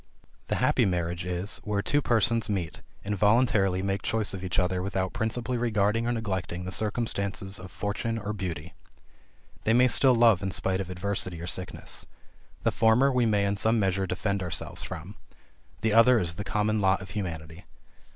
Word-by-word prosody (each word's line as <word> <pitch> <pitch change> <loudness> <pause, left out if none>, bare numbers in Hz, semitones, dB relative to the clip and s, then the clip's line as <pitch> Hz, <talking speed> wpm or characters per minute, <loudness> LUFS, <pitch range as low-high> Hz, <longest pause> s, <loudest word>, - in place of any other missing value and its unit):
The - - 0
happy - - +2
marriage 85 -1 -1
is, 90 +3 -2
where 105 -1 -2
two 145 +6 +1
persons 115 -2 +2
meet, 90 -6 -3 0.2
and 105 +1 -1
voluntarily 105 -3 +3
make 100 0 -1
choice 110 -3 -1
of 95 -1 -6
each 95 - -2
other 90 0 +1
without 95 -1 -2
principally 115 +2 -1
regarding 115 0 +1
or - - +1
neglecting 95 -6 -3
the 95 - -5
circumstances 100 -3 -1
of 95 - -9
fortune 105 +5 -3
or 105 -1 -4
beauty. 90 -4 -5 0.9
These 110 - +3
may 125 +1 +6
still 130 +1 +5
love 115 -5 +5
in 95 - -2
spite 95 0 -1
of 95 - -6
adversity 90 -1 -3
or 85 - -6
sickness. 90 +1 -3 0.6
The - - +2
former 115 +5 +4
we 125 -2 +2
may 105 -2 +2
in 100 0 0
some 110 +3 +2
measure 95 -1 0
defend 100 +2 -2
ourselves 90 -3 -4
from; 90 +6 -7 0.6
the 110 -1 +1
other 120 +2 +6
is 85 -6 -1
the 90 - -5
common 105 +1 0
lot 95 0 +2
of 95 - -11
humanity. 80 -4 -6
100 Hz, 180 wpm, -27 LUFS, 95-110 Hz, 0.9 s, may